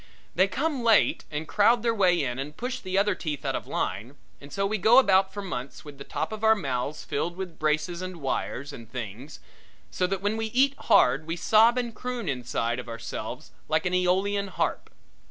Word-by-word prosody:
They 185 Hz, +3 st, +4 dB
come 275 Hz, +6 st, -1 dB
late 225 Hz, -3 st, +3 dB
and 150 Hz, +1 st, -4 dB
crowd 225 Hz, +5 st, +3 dB
their 230 Hz, -1 st, +2 dB
way 180 Hz, -6 st, +3 dB
in 125 Hz, -1 st, -3 dB
and 150 Hz, +2 st, -6 dB
push 250 Hz, +1 st, -3 dB
the 185 Hz, 0 st, -3 dB
other 205 Hz, 0 st, +3 dB
teeth 150 Hz, -6 st, -5 dB
out -, -, 0 dB
of -, -, -5 dB
line 115 Hz, +8 st, -3 dB, 0.3 s
and 140 Hz, 0 st, -12 dB
so 195 Hz, 0 st, -1 dB
we 215 Hz, +1 st, -1 dB
go 220 Hz, +6 st, +6 dB
about 195 Hz, -6 st, +5 dB
for 205 Hz, +1 st, -6 dB
months 140 Hz, -8 st, -6 dB
with 145 Hz, -2 st, -11 dB
the -, -, -6 dB
top -, -, -3 dB
of 215 Hz, 0 st, -6 dB
our 220 Hz, 0 st, +6 dB
mouths 140 Hz, -, -3 dB
filled 170 Hz, +5 st, -3 dB
with 185 Hz, -3 st, -6 dB
braces 155 Hz, +3 st, 0 dB
and 185 Hz, 0 st, -5 dB
wires 140 Hz, 0 st, -3 dB
and 115 Hz, -2 st, -11 dB
things, 125 Hz, +4 st, -7 dB, 0.5 s
so 180 Hz, -, 0 dB
that 195 Hz, 0 st, -3 dB
when 205 Hz, +2 st, 0 dB
we 225 Hz, 0 st, -2 dB
breathe 265 Hz, +4 st, +3 dB
hard 145 Hz, +5 st, +3 dB
we 165 Hz, -, -2 dB
sob 225 Hz, +7 st, +4 dB
and 240 Hz, -2 st, -2 dB
croon 250 Hz, -2 st, -5 dB
inside 125 Hz, -3 st, -2 dB
of 125 Hz, -, -7 dB
ourselves 115 Hz, 0 st, -6 dB, 0.2 s
like 155 Hz, 0 st, +1 dB
an 180 Hz, -, 0 dB
Aeolean 190 Hz, +3 st, +1 dB
harp. -, -, -2 dB
180 Hz, 210 wpm, -26 LUFS, 140-215 Hz, 0.5 s, go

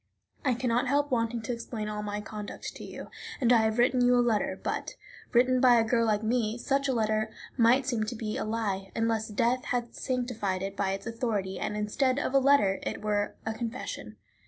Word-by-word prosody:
I 255 Hz, -3 st, +2 dB
can 250 Hz, +2 st, -2 dB
not 245 Hz, +3 st, +2 dB
help 285 Hz, +2 st, +1 dB
wanting 230 Hz, -1 st, 0 dB
to 245 Hz, -, -2 dB
explain 230 Hz, -2 st, -5 dB
all 210 Hz, 0 st, -3 dB
my 210 Hz, 0 st, -3 dB
conduct 210 Hz, -1 st, -7 dB
to -, -, -9 dB
you, -, -, -9 dB, 0.3 s
and 250 Hz, -3 st, +4 dB
I -, -, +7 dB
have 220 Hz, 0 st, +1 dB
written 245 Hz, +1 st, +3 dB
you 245 Hz, 0 st, +5 dB
a -, -, +4 dB
letter; 235 Hz, -4 st, +1 dB
but, -, -, -3 dB, 0.4 s
written 255 Hz, +1 st, +4 dB
by 250 Hz, -2 st, +7 dB
a 230 Hz, -, +5 dB
girl 230 Hz, 0 st, +2 dB
like 210 Hz, 0 st, +1 dB
me, 225 Hz, 0 st, 0 dB
such 275 Hz, +2 st, 0 dB
a -, -, +2 dB
letter 220 Hz, -1 st, +1 dB, 0.3 s
might 250 Hz, +2 st, +4 dB
seem 235 Hz, -5 st, 0 dB
to 235 Hz, +3 st, -4 dB
be 215 Hz, -1 st, -3 dB
a -, -, -2 dB
lie, 205 Hz, -3 st, -2 dB
unless 225 Hz, -1 st, 0 dB
death 235 Hz, +4 st, 0 dB
had 240 Hz, -1 st, -2 dB
sanctified 235 Hz, -7 st, -2 dB
it 195 Hz, 0 st, -4 dB
by 195 Hz, -1 st, 0 dB
its 195 Hz, 0 st, -6 dB
authority, 220 Hz, -5 st, -2 dB
and, 210 Hz, -, -2 dB
instead 255 Hz, +5 st, +1 dB
of 280 Hz, -, -1 dB
a 275 Hz, -, +6 dB
letter, 260 Hz, -8 st, +4 dB
it -, -, -4 dB
were 205 Hz, -1 st, 0 dB
a 220 Hz, -, -1 dB
confession. 225 Hz, -, -5 dB
230 Hz, 215 wpm, -29 LUFS, 210-250 Hz, 0.4 s, I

